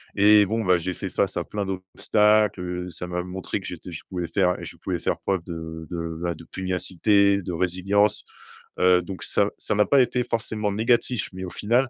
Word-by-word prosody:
et 105 0 +6
bon, 110 +1 -1
bah, 90 -1 +5
j’ai 90 +1 -3
fait - - -5
face - - 0
à - - 0
plein 105 -1 -4
d’obstacles. 105 +2 +2
Heu, 90 0 -4
ça 90 - -6
m’a 90 0 -2
montré 95 +2 -4
que 95 - -9
j’étais 90 +1 -8
je 80 - -6
pouvais 90 -2 -3
faire 90 -3 +3
je - - -8
pouvais - - -3
faire - - -1
preuve 95 -4 -1
de 80 -1 -6
de, 85 -1 -4
bah, 85 -1 0
de 85 - -12
pugnacité, 95 +2 +1
de 90 - -4
résilience, 95 +4 +1 0.5
heu, 90 0 +5
donc 95 +1 -7
ça - - +1
ça - - -2
n’a 105 0 +4
pas 140 -2 +5
été 125 0 0
forcément 110 -3 -2
négatif. 115 +1 +1
Mais 95 0 -5
au - - -6
final, 120 +7 +1
95 Hz, 205 wpm, -24 LUFS, 90-105 Hz, 0.5 s, et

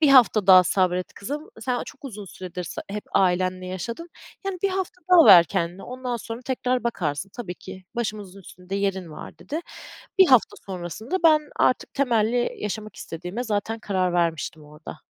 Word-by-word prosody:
"1 305 - +5
hafta 235 -7 +6
daha 185 -1 +9
sabret 180 0 +1
kızım. 290 +9 -6
Sen 245 +1 -1
çok 280 - -13
uzun 210 -6 -7
süredir 180 -1 -7
s - - -6
hep 210 +1 -5
ailenle 185 0 +1
yaşadın, 230 - -5 0.4
yani, 380 -2 -2
1 395 - +3
hafta 375 -1 -3
daha 335 -3 +9
ver 180 -5 +10
kendine, 170 +3 -3
ondan 250 -1 -4
sonra 230 +1 -7
tekrar 255 -1 -1
bakarsın. 180 -5 -2
Tabii 195 -8 -5
ki 190 +1 -11
başımızın 210 -4 -4
üstünde 180 +1 -9
yerin 190 -4 -1
var." - - -10
dedi. 315 +3 -4 0.6
1 380 - +8
hafta 255 -6 +4
sonrasında 190 - -4
ben 310 -2 +7 0.2
artık 255 - +1
temelli 240 -2 +1
yaşamak 215 +1 -5
istediğime 180 +9 -5
zaten 220 0 -2
karar 185 -4 0
vermiştim 165 -3 -1
orada. 150 +1 -11
205 Hz, 165 wpm, -24 LUFS, 180-245 Hz, 0.6 s, ver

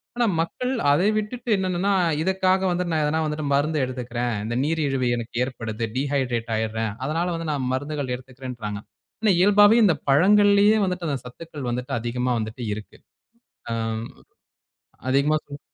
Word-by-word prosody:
ஆனா 240 0 +2
மக்கள் 250 +10 -2 0.2
அதை 175 +7 +3
விட்டுட்டு 235 +3 -4
என்னன்னா, 185 +1 0 0.3
இதற்காக 190 +1 +2
வந்துட்டு 175 -1 -1
நான் 155 - +1
எதனா 155 +2 +1 0.3
மருந்து 150 +3 +1
எடுத்துக்கிறேன். 125 -2 -3
இந்த 120 +2 -3
நீரிழிவு 145 -5 0
எனக்கு 115 0 -7
ஏற்படுது, 115 -3 -4
டீஹைட்ரேட் 130 -4 -1
ஆயிடுறேன். 110 0 -1
அதனால 165 +4 -1
வந்து 165 -1 -4
நான் 135 -4 -1
மருந்துகள் 145 -1 -2
எடுத்துக்கிறேன்றாங்க. 125 -5 -7 0.4
ஆனா 215 -3 +4
இயல்பாவே 205 +3 +6
இந்தப் 180 -6 +2
பழங்கள்லயே 205 +7 +5
வந்துட்டு 180 -2 -3
அந்தச் 135 -3 -3
சத்துக்கள் 145 0 -7
வந்துட்டு 125 +3 -3
அதிகமா 125 +2 -1
வந்துட்டு 110 +3 -5
இருக்கு. 105 0 -9 0.7
அ - - 0 1.4
அதிகமா 140 +3 +3
சொல் 145 0 -9
145 Hz, 135 wpm, -24 LUFS, 125-180 Hz, 1.4 s, இயல்பாவே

